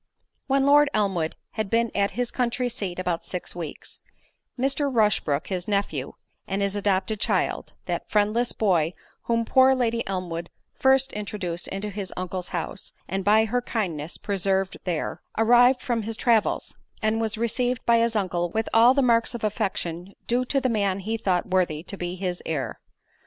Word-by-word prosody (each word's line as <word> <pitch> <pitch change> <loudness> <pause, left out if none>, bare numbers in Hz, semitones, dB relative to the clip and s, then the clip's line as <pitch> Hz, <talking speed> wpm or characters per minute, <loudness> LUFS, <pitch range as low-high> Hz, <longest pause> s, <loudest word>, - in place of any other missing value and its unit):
When 275 0 +3
Lord 290 +1 +6
Elmwood 190 -6 0 0.2
had 215 -3 -3
been 230 +1 +2
at 200 0 +2
his 245 -1 -1
country 250 0 0
seat 195 -7 -4
about 180 -2 -2
six 180 -1 -5
weeks, 165 -4 -7 0.6
Mr. 275 +2 +1
Rushbrook, 210 - +2
his 180 -2 -3
nephew, 200 -10 -1 0.3
and 195 +1 -1
his 200 0 -1
adopted 200 +1 0
child—that - - -2
friendless 215 +3 +2
boy 175 -6 +1 0.3
whom 230 -1 +1
poor 260 +2 +5
Lady 235 -2 0
Elmwood 175 -3 -3 0.2
first 265 0 +3
introduced 195 -5 -4
into 205 +2 -4
his 200 -2 -5
uncle's 180 0 -4
house, 170 -3 -4
and 195 +1 -2
by 215 +3 +5
her 245 +3 0
kindness 175 -10 -3
preserved 195 -1 0
there—arrived 240 +8 +2
from 235 -2 0
his 220 +1 -4
travels, 230 -4 +1 0.3
and 220 +1 +1
was 225 0 -1
received 245 +2 0
by 235 -1 +5
his 230 0 +1
uncle 175 -4 0
with 220 +5 -1
all 235 +3 +7
the 275 - +3
marks 235 -1 +3
of 235 - -6
affection 190 -3 -2
due 245 +2 +1
to 275 +2 +1
the 260 - 0
man 200 -5 0
he 220 +4 -2
thought 190 -5 0
worthy 175 -5 +1
to 200 - -5
be 175 -1 -4
his 180 -1 -3
heir. 155 -4 -3
210 Hz, 165 wpm, -25 LUFS, 185-235 Hz, 0.6 s, all